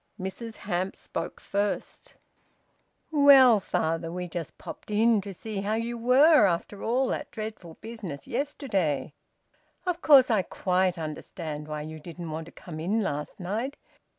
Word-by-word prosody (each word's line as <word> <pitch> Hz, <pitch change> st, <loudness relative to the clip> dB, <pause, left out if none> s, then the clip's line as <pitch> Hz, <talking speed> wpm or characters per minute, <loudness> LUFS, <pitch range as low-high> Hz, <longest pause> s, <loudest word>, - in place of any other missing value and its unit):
Mrs 220 Hz, +4 st, -6 dB
Hamps 185 Hz, +2 st, -3 dB
spoke -, -, -5 dB
first 205 Hz, +1 st, -3 dB, 1.0 s
"Well, 275 Hz, -6 st, +8 dB
father, 165 Hz, -3 st, -1 dB
we 180 Hz, +1 st, -4 dB
just 165 Hz, -2 st, -6 dB
popped -, -, -10 dB
in 220 Hz, +1 st, +3 dB
to 200 Hz, +1 st, -7 dB
see 200 Hz, +2 st, -5 dB
how 210 Hz, +2 st, 0 dB
you 230 Hz, +1 st, -2 dB
were 250 Hz, +2 st, +6 dB
after 180 Hz, +3 st, -2 dB
all 250 Hz, +4 st, +1 dB
that -, -, -3 dB
dreadful 215 Hz, -7 st, -7 dB
business 215 Hz, -11 st, -7 dB
yesterday. 200 Hz, -, -1 dB, 0.7 s
Of 355 Hz, -1 st, -1 dB
course 270 Hz, -5 st, +7 dB
I 215 Hz, -3 st, +4 dB
quite 185 Hz, 0 st, 0 dB
understand 155 Hz, -1 st, -6 dB, 0.2 s
you 155 Hz, 0 st, -8 dB
didn't 170 Hz, +1 st, -8 dB
want 160 Hz, +1 st, -5 dB
to -, -, -12 dB
come 155 Hz, -3 st, -9 dB
in 205 Hz, +7 st, 0 dB
last 150 Hz, -1 st, -4 dB
night. 220 Hz, +10 st, -3 dB
200 Hz, 145 wpm, -27 LUFS, 170-230 Hz, 1.0 s, Well